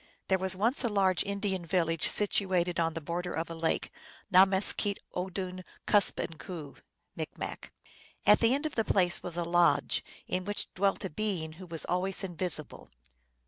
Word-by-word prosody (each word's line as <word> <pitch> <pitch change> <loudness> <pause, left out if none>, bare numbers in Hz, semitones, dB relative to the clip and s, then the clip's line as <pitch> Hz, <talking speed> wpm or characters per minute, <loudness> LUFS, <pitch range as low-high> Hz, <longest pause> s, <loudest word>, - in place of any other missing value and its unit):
THERE 190 -1 +3
was 190 0 +1
once 230 +9 +2
a 240 - +1
large 190 -3 +2
Indian 200 -2 -2
village 165 -1 +3
situated 185 -4 +1
on 165 -1 0
the 165 - -4
border 175 +3 -3
of 165 +1 -3
a - - -3
lake, 165 0 -1 0.4
Nameskeett 195 +2 +5 0.2
oodun 185 0 -4 0.2
Kuspemku 165 -6 0 0.4
(M.). - - -4 0.8
At 210 - +7
the 230 +3 +4
end 285 +3 -3
of 310 - -2
the 225 - +1
place 180 -4 +2
was 175 -1 -6
a 175 - 0
lodge, 175 +1 +2 0.2
in 185 0 -2
which 205 +2 -2
dwelt 195 +1 0
a - - -3
being 180 -3 -2
who 185 - -9
was 165 -3 -5
always 190 +2 -1
invisible. 175 -4 -5
185 Hz, 160 wpm, -30 LUFS, 170-200 Hz, 0.8 s, At